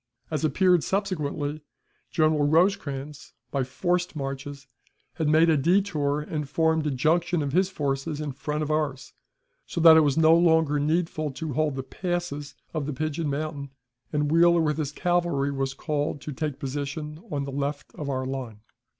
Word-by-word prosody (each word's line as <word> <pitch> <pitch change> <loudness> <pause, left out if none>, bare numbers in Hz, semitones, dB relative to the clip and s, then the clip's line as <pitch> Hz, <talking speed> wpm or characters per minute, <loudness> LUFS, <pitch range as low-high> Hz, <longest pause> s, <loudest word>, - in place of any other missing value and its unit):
As 155 -1 -1
appeared 180 +3 +3
subsequently, 155 -6 -2 0.5
General 155 -2 +2
Rosecrans, 150 -4 0 0.2
by 135 -2 0
forced 175 +7 -1
marches, 135 0 -5 0.5
had 160 -2 -1
made 160 +2 +5
a 160 - +4
détour, 150 -3 +1
and 150 -3 -3
formed 160 -1 +1
a - - +2
junction 160 +4 +1
of 140 -1 -3
his 185 +2 +3
forces 145 -2 -2
in 150 -2 -3
front 150 +3 -3
of 155 - -2
ours, 145 -5 -2 0.5
so - - -4
that 160 -1 +9
it - - +7
was 145 -1 +1
no 160 0 +6
longer 160 -3 +3
needful 155 0 0
to 145 +3 -4
hold 150 0 0
the 135 - -4
passes 175 -1 -4 0.2
of 155 -3 -2
the 150 - -2
Pigeon 155 +2 -2
Mountain, 145 -1 -3 0.4
and 150 -1 0
Wheeler 170 +1 +5
with 150 -1 0
his 150 -2 -2
cavalry 175 -5 0
was 135 -1 -2
called 145 -2 -2
to 150 - -6
take 145 0 -3
position 145 +3 -5
on 145 -4 -2
the 140 - -5
left 140 +1 -3
of 145 -2 -5
our 130 -1 -1
line. 130 -5 -5
150 Hz, 170 wpm, -26 LUFS, 140-160 Hz, 0.5 s, that